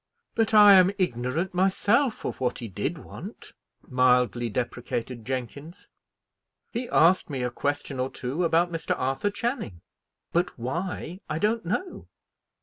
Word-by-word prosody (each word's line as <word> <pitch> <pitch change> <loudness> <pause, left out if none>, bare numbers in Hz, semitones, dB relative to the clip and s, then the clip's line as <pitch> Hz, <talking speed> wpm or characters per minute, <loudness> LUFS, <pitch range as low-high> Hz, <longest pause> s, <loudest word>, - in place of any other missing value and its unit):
"But 225 -1 +1
I 205 -1 +9
am 185 -1 +7
ignorant 160 - -1
myself 205 +7 +2
of - - -4
what 125 -1 0
he 115 - -6
did 95 - -3
want," - - -10 0.3
mildly 125 -2 +2
deprecated 120 +1 -4
Jenkins. 140 - -6 0.8
"He 240 +1 -4
asked 170 +3 +4
me 135 -3 -3
a 125 - -1
question 145 0 -3
or 130 +1 0
two 135 +9 -3
about 170 +1 +2
Mr. 165 -1 -2
Arthur 135 +10 0
Channing, 225 - -4 0.5
but 175 +2 0
why 170 +7 -4
I 155 - -1
don't 215 +3 0
know." 360 - -3
160 Hz, 140 wpm, -26 LUFS, 125-195 Hz, 0.8 s, I